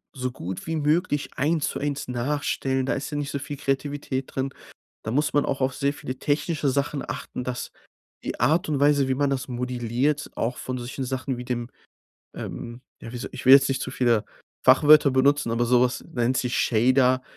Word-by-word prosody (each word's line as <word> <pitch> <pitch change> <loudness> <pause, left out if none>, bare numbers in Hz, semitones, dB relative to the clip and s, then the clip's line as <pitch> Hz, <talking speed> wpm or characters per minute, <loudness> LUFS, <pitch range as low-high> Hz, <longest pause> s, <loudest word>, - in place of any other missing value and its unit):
so 130 -1 -2
gut 95 - -7
wie 165 - -1
möglich 150 0 0
eins 155 +2 +1
zu - - -4
eins 145 -2 -3
nachstellen, 130 +1 -1
da - - 0
ist 140 - -4
ja 145 - -4
nicht 145 0 -3
so 140 - -2
viel 145 +1 -6
Kreativität 135 -1 -2
drin, 135 0 -2 0.5
da - - -5
muss 145 +6 +1
man 145 - +3
auch 135 - -2
auf 130 0 +1
sehr 140 +1 0
viele 130 -2 -7
technische 150 +1 0
Sachen 140 +1 -1
achten, 125 - -5
dass 125 0 -4 0.5
die - - -4
Art 160 +1 +2
und 145 -3 0
Weise, 145 -1 +4
wie 130 - +1
man 140 +1 +1
das 130 -2 -2
modelliert, 125 +3 -1
auch 125 +2 -2
von 130 0 -4
solchen 125 +2 -5
Sachen 130 0 -3
wie 125 - -6
dem, 120 -1 -3 0.7
ähm, 120 +1 -7 0.2
ja, 115 - -8
wie - - -5
soll 120 - -6
ich - - -8
will 130 - +11
jetzt 135 0 +6
nicht 135 - -1
zu - - -3
viele 120 -4 +2 0.4
Fachwörter 150 -1 +7
benutzen, 140 0 +3
aber 115 +1 +1
sowas 125 +1 +2
nennt 120 +1 0
sich 125 -1 -1
Shader 130 +2 +3
130 Hz, 200 wpm, -25 LUFS, 125-145 Hz, 0.7 s, will